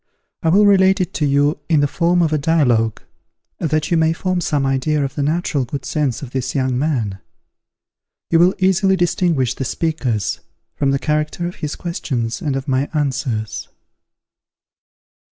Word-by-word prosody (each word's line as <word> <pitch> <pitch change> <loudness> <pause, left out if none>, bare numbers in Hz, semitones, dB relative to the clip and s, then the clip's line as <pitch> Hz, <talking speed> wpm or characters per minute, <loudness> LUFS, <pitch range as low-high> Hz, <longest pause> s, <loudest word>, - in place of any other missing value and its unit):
I 165 - +1
will 200 +5 +5
relate 195 0 +5
it 185 - -2
to 150 - 0
you 145 +2 +2
in 155 -3 +4
the 145 - +3
form 175 +3 +2
of 155 -1 0
a - - +3
dialogue, 125 -8 +1 0.6
that 155 -1 -1
you 170 - +3
may 160 0 +3
form 185 +1 -1
some 145 -4 0
idea 140 +2 +1
of 135 - -5
the 145 - -3
natural 150 -1 0
good 130 +3 -6
sense 150 -3 -1
of 125 - -8
this 130 +1 -3
young 130 -2 0
man. 125 -9 -1 1.1
You 165 - +5
will 180 +2 +4
easily 190 +1 +3
distinguish 170 -7 +1
the - - -4
speakers, 130 - -1 0.4
from 140 - 0
the 135 - +2
character 150 +4 -1
of 175 - -5
his 150 -1 -4
questions 120 -9 -3
and 145 -4 -1
of 135 0 -4
my 135 +1 0
answers. 125 -7 -2
150 Hz, 170 wpm, -19 LUFS, 135-170 Hz, 1.1 s, will